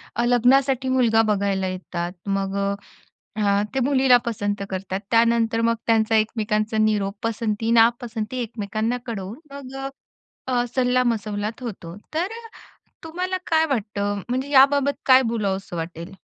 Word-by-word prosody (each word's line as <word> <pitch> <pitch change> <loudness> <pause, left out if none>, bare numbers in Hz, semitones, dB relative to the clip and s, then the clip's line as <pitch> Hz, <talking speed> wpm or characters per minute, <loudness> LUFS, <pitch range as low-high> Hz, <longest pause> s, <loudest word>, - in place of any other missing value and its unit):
अ, 235 - 0
लग्नासाठी 260 +2 +3
मुलगा 235 -4 +3
बघायला 195 -2 0
येतात 180 -1 -4 0.2
मग 195 0 -1
अ, 200 0 0 0.7
अ, 200 -1 +2
ते 265 - +1
मुलीला 265 -2 +5
पसंत 205 -3 -2
करतात. 190 0 -4
त्यानंतर 230 0 +3
मग 230 0 +2
त्यांचा 225 -1 +3
एकमेकांचा 215 0 0
निरोप 210 -2 +1
पसंती, 225 -1 -1
नापसंती 230 0 +2
एकमेकांना 220 +1 -2
कळवून 215 -1 -5 0.2
मग 270 -2 -9
अ, - - -2 0.6
अ, 250 -2 +1
सल्लामसलत 230 -4 0
होतो. 185 -7 -7 0.2
तर 350 +6 -1 0.7
तुम्हाला 365 +3 -3
काय 320 -1 +3
वाटतं? 205 -6 -2
म्हणजे 260 +3 -2
याबाबत 280 0 +5
काय 260 0 +7
बोलावंसं 195 -5 -2
वाटेल? 165 +2 -6
225 Hz, 130 wpm, -23 LUFS, 200-255 Hz, 0.7 s, काय